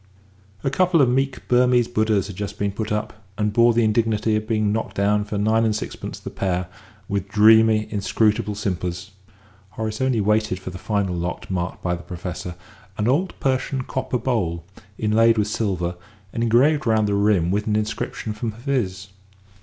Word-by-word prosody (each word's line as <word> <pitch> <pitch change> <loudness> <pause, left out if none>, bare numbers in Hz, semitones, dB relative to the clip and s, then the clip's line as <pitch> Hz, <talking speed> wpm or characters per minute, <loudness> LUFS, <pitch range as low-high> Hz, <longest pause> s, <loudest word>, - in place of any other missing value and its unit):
A 135 - 0
couple 180 +2 +3
of 135 - +5
meek 135 +1 -1
Burmese 125 -1 +4
Buddhas 110 -4 +1
had 100 -2 -8
just 100 +1 -5
been 100 0 -1
put 105 +2 -4
up, 105 0 -3
and 105 -1 0
bore 120 +1 +5
the 115 0 +2
indignity 110 0 +1
of 110 0 -2
being 110 -2 +1
knocked 110 +1 -3
down 105 +1 +2
for 105 0 -4
nine 110 +2 +2
and 110 -2 +1
sixpence 110 - -6
the - - -8
pair 90 -1 -1 0.4
with 100 -1 -2
dreamy, 110 +1 +5
inscrutable 105 +1 +1
simpers; 90 -2 -3 0.7
Horace 110 0 -3
only 130 -3 +2
waited 105 -1 +1
for 95 0 -7
the 90 - -8
final 100 -3 -1
lot 85 +2 -4
marked 90 0 -3
by 90 - 0
the 85 - -4
Professor 90 0 -6 0.4
an 105 - 0
old 165 +9 0
Persian 130 0 0
copper 130 0 -2
bowl, 95 -10 -1 0.3
inlaid 115 +1 +3
with 105 -1 +1
silver 90 -5 -1 0.4
and 115 - -2
engraved 135 +5 +3
round 110 -1 +3
the 100 - 0
rim 100 -4 +2
with 105 +2 -1
an 105 - +1
inscription 110 0 -3
from 110 +1 -4
Hafiz. 110 -6 -2
105 Hz, 175 wpm, -22 LUFS, 100-115 Hz, 0.7 s, of